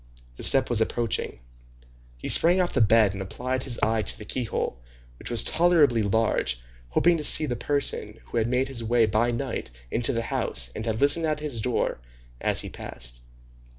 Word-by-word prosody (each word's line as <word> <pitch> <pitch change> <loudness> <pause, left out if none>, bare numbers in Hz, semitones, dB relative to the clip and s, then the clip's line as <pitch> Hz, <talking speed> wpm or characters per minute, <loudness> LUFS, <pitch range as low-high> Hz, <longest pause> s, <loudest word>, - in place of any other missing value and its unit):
The - - -12
step 135 - +6
was 120 -2 +1
approaching. 115 - -2 0.8
He - - -7
sprang 175 +3 +4
off 180 -1 0
the 130 - +1
bed 110 -2 +4
and 100 - -6
applied 125 +6 -4
his 125 -3 -3
eye 110 0 +1
to 100 - +2
the 105 - -10
keyhole, 110 - -3 0.4
which - - -7
was 120 -2 +3
tolerably 155 -8 +3
large, 100 - 0 0.3
hoping 170 - +2
to 150 - -5
see 155 - +5
the 125 -4 -3
person 120 -4 -1
who - - -6
had 115 0 +1
made 125 +2 0
his 125 -4 -3
way 115 0 +2
by 110 +3 0
night 120 - -4 0.2
into 115 0 +1
the 115 -1 -2
house 60 - 0
and 110 - -5
had 110 0 -2
listened 145 +3 +3
at 155 -1 -1
his 145 -7 -2
door, 125 - -2 0.4
as - - +2
he - - -7
passed. - - -6
115 Hz, 190 wpm, -25 LUFS, 110-135 Hz, 0.8 s, step